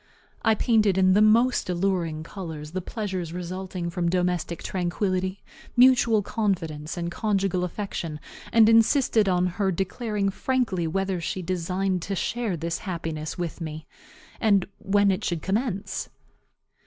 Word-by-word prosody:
I 220 - +3
painted, 215 -4 +3
in 185 0 +5
the 205 - +5
most 230 +1 +4
alluring 175 -4 0
colors, 160 -4 -7
the 185 +2 -3
pleasures 185 -5 -4
resulting 180 0 -4
from 170 0 0
domestic 180 -1 -1
tranquillity, 185 +1 -1 0.3
mutual 240 -4 +5
confidence, 165 -8 -2
and 170 0 -3
conjugal 195 -2 0
affection, 175 -4 -4 0.3
and 225 -1 +6
insisted 225 -1 +4
on 180 -1 +2
her 190 +2 0
declaring 200 +2 -1
frankly 225 -8 0
whether 190 +1 -1
she 185 +3 -3
designed 185 +1 -1
to 195 +4 -3
share 220 -2 -1
this 165 +1 -3
happiness 165 -4 -4
with 175 0 -4
me, 155 -1 -6 0.5
and 200 -5 +3
when 200 0 +3
it 190 +3 -2
should 170 -3 -2
commence. 200 -1 -2
185 Hz, 135 wpm, -25 LUFS, 170-210 Hz, 0.5 s, and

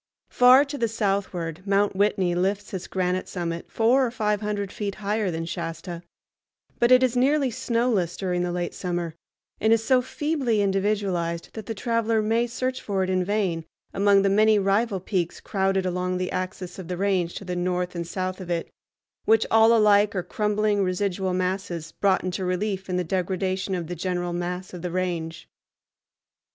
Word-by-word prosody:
Far 255 +3 +7
to 285 0 -6
the 230 - +2
southward 195 -6 -2
Mount 200 0 +2
Whitney 190 -3 +2
lifts 195 +4 -1
its 185 -1 -4
granite 185 0 -1
summit 170 -2 -4
four 240 +4 +3
or 250 - +1
five 210 -3 -1
hundred 205 -2 -2
feet 200 -2 -4
higher 210 0 -1
than 165 -1 -3
Shasta, 170 0 -5 0.8
but 240 +1 +3
it 255 0 +7
is 255 -1 +2
nearly 270 +1 +2
snowless 230 -7 0
during 180 -2 -1
the 175 0 -1
late 175 0 -3
summer, 175 -3 -3 0.5
and 220 - +2
is 225 0 +4
so 255 +1 +4
feebly 260 -3 -1
individualized 195 -4 0
that 220 -3 -8
the 225 - -3
traveler 230 +1 0
may 230 +3 +1
search 255 +2 -3
for 195 -2 -1
it 185 - -1
in 185 -1 +1
vain 185 -4 -1 0.3
among 200 0 +4
the 195 - +3
many 215 +2 +4
rival 200 +1 +1
peaks 180 -2 -2
crowded 195 -1 0
along 180 0 -1
the 185 0 -2
axis 185 0 -4
of 185 - -7
the 180 0 -4
range 185 -3 0
to 180 -2 -5
north 180 0 -1
and 170 -1 -4
south 185 +1 -3
of 180 - -8
it, 170 -1 -2 0.5
which 225 0 +4
all 225 +1 +6
alike 210 -2 +4
are 185 - -1
crumbling 210 0 0
residual 190 0 -1
masses 180 -3 -2
brought 195 -1 +1
into 185 +1 -3
relief 190 +1 -2
in 180 - 0
the 180 - 0
degradation 190 +2 -1
of 175 -2 -3
the 175 - -5
general 175 0 -2
mass 180 +2 -4
of 180 - -7
the 180 - -3
range. 170 -2 -3
195 Hz, 180 wpm, -25 LUFS, 180-215 Hz, 0.8 s, Far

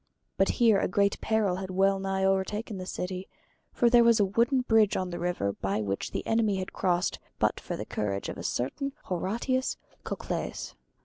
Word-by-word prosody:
But 195 - +2
here 225 -4 +5
a - - +1
great 200 +2 +1
peril 215 -5 +1
had 190 0 -5
well 195 +1 +2
nigh 190 0 -1
over 190 0 +3
taken 210 +1 -5
the 185 - -6
city; 185 0 -4 0.4
for 240 - +2
there 240 0 +6
was 235 -1 +5
a 205 - +5
wooden 235 +6 +2
bridge 220 -4 +3
on 185 -1 -2
the 175 - -4
river 170 - -1
by 100 +2 -2
which 100 -1 -2
the - - -4
enemy 225 -3 +2
had 185 0 -5
crossed 180 -1 0 0.2
but - - +1
for - - -5
the - - -5
courage 100 -2 -2
of - - -6
a - - -6
certain 275 - -2
Horatius 235 +8 -1 0.3
Cocles. - - -4
195 Hz, 195 wpm, -28 LUFS, 180-225 Hz, 0.4 s, there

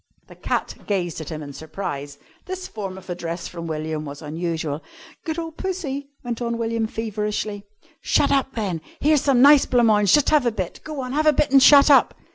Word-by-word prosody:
The - - -15
cat - - -2
gazed 175 -5 -2
at 160 - -7
him 155 -2 -6
in 140 -1 -9
surprise. 145 -2 -6 0.3
This 370 0 -5
form 195 -3 -6
of 190 - -13
address 170 -1 -5
from 170 -1 -7
William 155 -1 -3
was 145 +1 -8
unusual. 160 -1 -3 0.4
"Good 320 0 -3
ole 330 -1 -4
Pussy!" 310 -6 -4
went 240 -1 -4
on 235 -1 -2
William 230 -1 -1
feverishly. 210 -2 -3 0.4
"Shut - - +2
up, 270 -1 +1
then. 190 -8 -2 0.2
Here's 300 -1 +3
some 265 -3 +3
nice 285 0 +7
blanc 245 -1 +3
mange. 210 -3 +4
Just 295 -2 +4
have 295 -5 +4
a - - +2
bit. 185 -5 -5
Go 305 -3 -5
on, 255 0 -5
have 310 +2 +1
a 305 - +6
bit 290 - +1
and 275 -1 +7
shut 285 +1 +8
up." 275 - +5
220 Hz, 205 wpm, -22 LUFS, 170-275 Hz, 0.4 s, shut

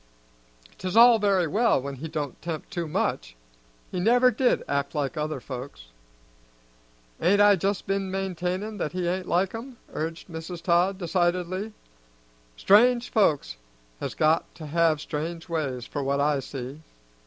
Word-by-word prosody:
'Tis 185 +3 -2
all 235 -1 +8
very 195 -4 +2
well 220 - +2
when 140 +1 -6
he 155 +5 -6
don't 150 -4 -5
'tempt 165 -2 -5
too 170 -2 -3
much. - - -2 0.6
He 180 - -2
never 245 +6 +4
did 245 +2 +1
act 140 +2 -2
like 145 +1 -1
other 155 0 -2
folks." 125 - -8 1.3
"Ain't 200 +4 +4
I 205 0 +7
just 195 +2 -1
been 195 0 -1
maintainin' 190 +2 -3
that 155 - -2
he 180 -1 -2
ain't 185 +1 -2
like 185 +2 +1
'em?" 240 +2 -8 0.2
urged 165 +1 -4
Mrs. 165 0 -7
Todd 180 +3 +2
decidedly. 180 +3 -1 0.8
"Strange 240 - +4
folks 150 - +1 0.4
has - - -4
got 155 +1 +2
to 160 - -9
have 160 0 +2
strange 165 +3 -5
ways, 140 -8 -3
for 145 - -4
what 140 +1 0
I 145 0 +2
see." 135 +2 -7
170 Hz, 150 wpm, -26 LUFS, 150-195 Hz, 1.3 s, all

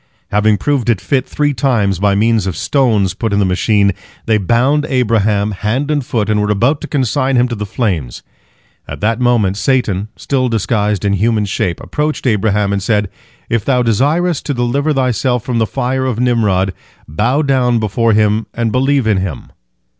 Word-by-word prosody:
Having 105 +1 +2
proved 140 -3 -1
it 110 -5 +2
fit 130 +3 -1
three 145 -1 0
times 115 -8 0
by 100 0 +2
means 110 -1 +1
of 90 -5 -3
stones 110 - +1
put 115 -3 -3
in 100 - +1
the 100 - +2
machine, 100 +2 +2 0.3
they 110 -1 +2
bound 125 +9 +2
Abraham, 110 -5 +1
hand 115 +9 -2
and 145 -2 0
foot, 115 -4 -2
and 105 -1 +1
were 105 - -1
about 125 +9 +1
to - - -6
consign 135 0 0
him 125 0 +3
to - - -3
the 105 -2 -4
flames. 90 - -3 0.6
At - - -7
that 115 +3 0
moment 115 -6 +1
Satan, 110 -6 0
still 130 -2 -1
disguised 105 -2 -1
in 100 - +2
human 105 +2 +1
shape, 90 -3 -2
approached 150 0 -3
Abraham, 105 -3 +1
and 100 - -1
said, 105 0 0 0.4
"If 115 -3 -1
thou 125 -3 +1
desirest 145 - +1
to 145 - -1
deliver 130 +5 0
thyself 125 -3 0
from 120 -2 -1
the 110 - +1
fire 130 +4 -2
of 120 -3 -2
Nimrod, 105 -7 +1 0.3
bow 115 - 0
down 130 -4 +2
before 110 +1 +1
him 105 +1 +1
and 115 -1 -1
believe 135 +1 +1
in 110 -3 +2
him." 95 -9 -5
115 Hz, 185 wpm, -15 LUFS, 105-130 Hz, 0.6 s, him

